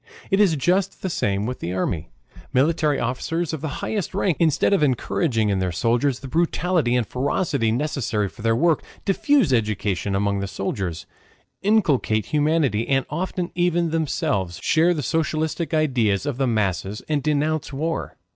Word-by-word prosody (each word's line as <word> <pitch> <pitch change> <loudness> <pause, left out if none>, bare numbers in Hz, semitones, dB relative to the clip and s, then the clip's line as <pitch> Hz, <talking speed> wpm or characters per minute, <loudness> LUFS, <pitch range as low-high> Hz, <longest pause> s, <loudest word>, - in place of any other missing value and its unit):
It 195 - +3
is 195 -6 +4
just 180 +7 0
the 190 - -1
same 100 -7 0
with 125 +2 -4
the 90 - -4
army. 85 -3 -2 0.4
Military 150 +1 +2
officers 165 +7 -2
of 155 - -4
the 160 - -2 0.2
highest 200 -3 -3
rank, 195 -4 +1
instead 165 +4 +3
of 195 - +3
encouraging 125 - +1
in 100 -2 +1
their 90 -1 -1
soldiers 120 +8 +1
the 135 - -7
brutality 165 -2 +1
and 125 -2 +1
ferocity 135 - 0
necessary 120 -5 -1
for 110 - -12
their 115 +1 +2
work, 165 +6 +2 0.2
diffuse 205 - +3
education 105 -3 0
among 100 0 0
the 100 - -3
soldiers, 95 -3 -4 0.6
inculcate 155 - +2
humanity, 150 -7 +1
and 135 -1 +2
often 180 +2 -3
even 175 -1 +1
themselves 145 - -1
share 170 +2 +3
the 150 - -3
socialistic 160 +4 -1
ideas 125 - +1
of 145 -4 -2
the 135 - +2
masses 105 -3 -1
and 150 -2 0
denounce 150 +1 0
war. 160 +4 -3
140 Hz, 160 wpm, -23 LUFS, 110-165 Hz, 0.6 s, is